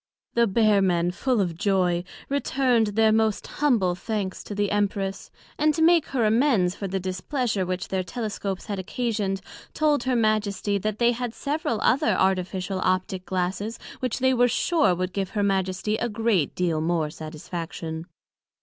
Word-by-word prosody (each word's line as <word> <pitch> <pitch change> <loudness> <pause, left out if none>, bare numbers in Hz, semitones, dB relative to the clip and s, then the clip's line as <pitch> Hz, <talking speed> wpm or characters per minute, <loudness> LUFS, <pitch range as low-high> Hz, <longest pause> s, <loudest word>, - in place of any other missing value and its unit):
The 235 0 +3
Bear 210 0 +3
men, 175 -2 +2
full 245 +5 0
of 175 -4 0
joy, 180 -2 +1 0.2
returned 260 -4 +2
their 220 +1 +3
most 220 -1 +1
humble 235 -12 +1
thanks 195 0 -4
to 205 - -6
the 205 0 0
Empress; 200 -1 -1 0.3
and 305 0 +3
to 320 - +2
make 335 -1 +5
her 250 -4 0
amends 220 -5 +3
for 200 - -5
the 190 +1 -2
displeasure 190 +2 -2
which 185 0 -3
their 190 -1 0
Telescopes 200 0 -4
had 200 -2 -4
occasioned, 200 -2 -2 0.3
told 300 -4 +2
her 260 -1 +1
Majesty, 215 -2 +1
that 215 +1 -2
they 235 +1 +4
had 245 -1 -4
several 285 -6 -2
other 285 +6 +3
artificial 190 0 0
Optick 185 0 0
Glasses, 190 +4 -2 0.2
which 255 -3 -2
they 260 0 +3
were 245 0 +4
sure 295 - +2
would 185 +1 -3
give 195 -2 -2
her 205 - +2
Majesty 195 +2 0
a 240 - -1
great 210 - +1
deal 170 -4 0
more 160 -2 0
satisfaction. 160 +1 -6
200 Hz, 165 wpm, -25 LUFS, 185-235 Hz, 0.3 s, make